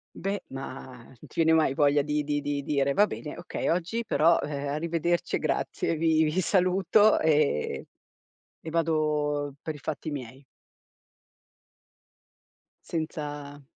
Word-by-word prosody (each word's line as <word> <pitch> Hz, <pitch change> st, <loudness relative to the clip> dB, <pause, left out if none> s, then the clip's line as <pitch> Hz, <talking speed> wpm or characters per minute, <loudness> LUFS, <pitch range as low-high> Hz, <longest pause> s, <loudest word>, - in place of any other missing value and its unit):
Beh, 200 Hz, +1 st, -3 dB
ma 130 Hz, -2 st, -8 dB
non 130 Hz, -, -18 dB
ti -, -, -12 dB, 0.2 s
viene 160 Hz, -, +4 dB
mai 160 Hz, -4 st, +3 dB
voglia 145 Hz, 0 st, +3 dB
di 150 Hz, +1 st, -1 dB
di 145 Hz, 0 st, -1 dB
di 145 Hz, 0 st, -2 dB
dire: 140 Hz, -1 st, +1 dB
"Va 205 Hz, -, +5 dB
bene, 150 Hz, -7 st, -7 dB
okay -, -, -4 dB
oggi 180 Hz, +7 st, -1 dB
però, 165 Hz, -2 st, +4 dB
ehm, 145 Hz, -1 st, -4 dB
arrivederci 170 Hz, +3 st, 0 dB
e -, -, 0 dB
grazie, 165 Hz, -, -1 dB
vi 160 Hz, 0 st, +3 dB
vi 155 Hz, +4 st, +1 dB
saluto 190 Hz, +3 st, +3 dB
e 155 Hz, -, +1 dB, 0.8 s
e 160 Hz, -, -5 dB
vado 150 Hz, -3 st, 0 dB
per 155 Hz, -, -4 dB
i -, -, -9 dB
fatti 155 Hz, +2 st, -4 dB
miei"? 130 Hz, 0 st, -7 dB, 2.4 s
Senza 145 Hz, -3 st, -5 dB
150 Hz, 135 wpm, -27 LUFS, 145-165 Hz, 2.4 s, Va